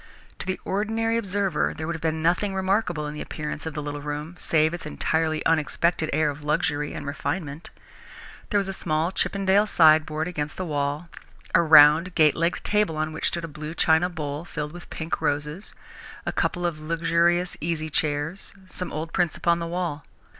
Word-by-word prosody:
To -, -, -6 dB
the 185 Hz, -, -2 dB
ordinary 225 Hz, +3 st, 0 dB
observer 200 Hz, -3 st, 0 dB
there 160 Hz, -, -4 dB
would 170 Hz, +1 st, -2 dB
have 160 Hz, -, -7 dB
been 160 Hz, -1 st, -1 dB
nothing 185 Hz, +4 st, +1 dB
remarkable 190 Hz, -4 st, 0 dB
in 150 Hz, -, -4 dB
the 150 Hz, -, -6 dB
appearance 150 Hz, +1 st, -5 dB
of 160 Hz, -, -5 dB
the 150 Hz, -, -3 dB
little 145 Hz, 0 st, -5 dB
room, 150 Hz, +3 st, -5 dB
save 155 Hz, 0 st, +2 dB
its 175 Hz, -3 st, -5 dB
entirely 160 Hz, 0 st, -1 dB
unexpected 160 Hz, +1 st, +1 dB
air 150 Hz, 0 st, +2 dB
of 145 Hz, +1 st, -10 dB
luxury 150 Hz, 0 st, 0 dB
and -, -, -6 dB
refinement. 145 Hz, +2 st, -4 dB, 0.8 s
There 205 Hz, -, +2 dB
was 200 Hz, -1 st, +1 dB
a 195 Hz, -, -3 dB
small 160 Hz, -1 st, 0 dB
Chippendale 195 Hz, +1 st, +2 dB
sideboard 155 Hz, -2 st, +4 dB
against 150 Hz, -4 st, -4 dB
the 185 Hz, -, -3 dB
wall, 145 Hz, +1 st, -2 dB, 0.5 s
a -, -, +6 dB
round, 160 Hz, +2 st, +7 dB
gate 155 Hz, -3 st, +5 dB
legged 170 Hz, +1 st, 0 dB
table 210 Hz, -7 st, +1 dB
on 155 Hz, 0 st, -1 dB
which 160 Hz, -, 0 dB
stood 170 Hz, -1 st, -2 dB
a -, -, -6 dB
blue 155 Hz, +1 st, -7 dB
china 160 Hz, +2 st, +3 dB
bowl 150 Hz, -3 st, -4 dB
filled 150 Hz, -3 st, -5 dB
with 175 Hz, -, -11 dB
pink 160 Hz, 0 st, -4 dB
roses, 150 Hz, +4 st, -2 dB, 0.5 s
a -, -, -1 dB
couple 175 Hz, -2 st, -1 dB
of 165 Hz, -3 st, -2 dB
luxurious 170 Hz, +2 st, +1 dB
easy 155 Hz, -1 st, -2 dB
chairs, 155 Hz, +6 st, -1 dB, 0.2 s
some 180 Hz, -, -4 dB
old 160 Hz, +2 st, -5 dB
prints 175 Hz, -3 st, +1 dB
upon 170 Hz, 0 st, +2 dB
the 170 Hz, -, -3 dB
wall. 170 Hz, -4 st, -3 dB
160 Hz, 185 wpm, -25 LUFS, 150-175 Hz, 0.8 s, round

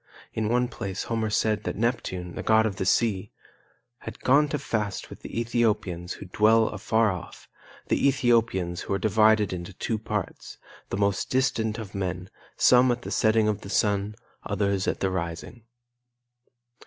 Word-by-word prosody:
In 110 Hz, -1 st, -1 dB
one 125 Hz, +1 st, +2 dB
place 100 Hz, -5 st, -5 dB
Homer 110 Hz, -1 st, -1 dB
said 105 Hz, 0 st, +1 dB
that -, -, -3 dB
Neptune, 95 Hz, -7 st, -2 dB
the -, -, -5 dB
god 110 Hz, 0 st, +4 dB
of 105 Hz, -3 st, -2 dB
the 95 Hz, -, -2 dB
sea, 105 Hz, -2 st, +1 dB, 0.7 s
"had -, -, -9 dB
gone 145 Hz, +3 st, +4 dB
to 145 Hz, -, -2 dB
feast 105 Hz, -8 st, -3 dB
with -, -, -10 dB
the -, -, -5 dB
Ethiopians 105 Hz, -7 st, 0 dB
who -, -, -10 dB
dwell 110 Hz, +4 st, +3 dB
afar 110 Hz, +1 st, +1 dB
off, 90 Hz, -2 st, -9 dB, 0.4 s
the -, -, +2 dB
Ethiopians 115 Hz, -9 st, +1 dB
who 100 Hz, -, -2 dB
are -, -, +1 dB
divided 110 Hz, -1 st, +3 dB
into 90 Hz, +1 st, -6 dB
two 110 Hz, +4 st, -3 dB
parts, 105 Hz, -3 st, -5 dB, 0.3 s
the -, -, -3 dB
most 100 Hz, -1 st, 0 dB
distant 125 Hz, -4 st, 0 dB
of 110 Hz, -4 st, -8 dB
men, 90 Hz, -1 st, -4 dB, 0.3 s
some 125 Hz, 0 st, +5 dB
at 120 Hz, 0 st, -3 dB
the -, -, -6 dB
setting 110 Hz, -1 st, +3 dB
of 105 Hz, -1 st, -1 dB
the 100 Hz, -, -9 dB
sun, 105 Hz, -1 st, 0 dB, 0.3 s
others 100 Hz, -1 st, -1 dB
at -, -, -1 dB
the 95 Hz, -, +1 dB
rising." 85 Hz, +6 st, -5 dB
105 Hz, 165 wpm, -26 LUFS, 95-115 Hz, 0.7 s, some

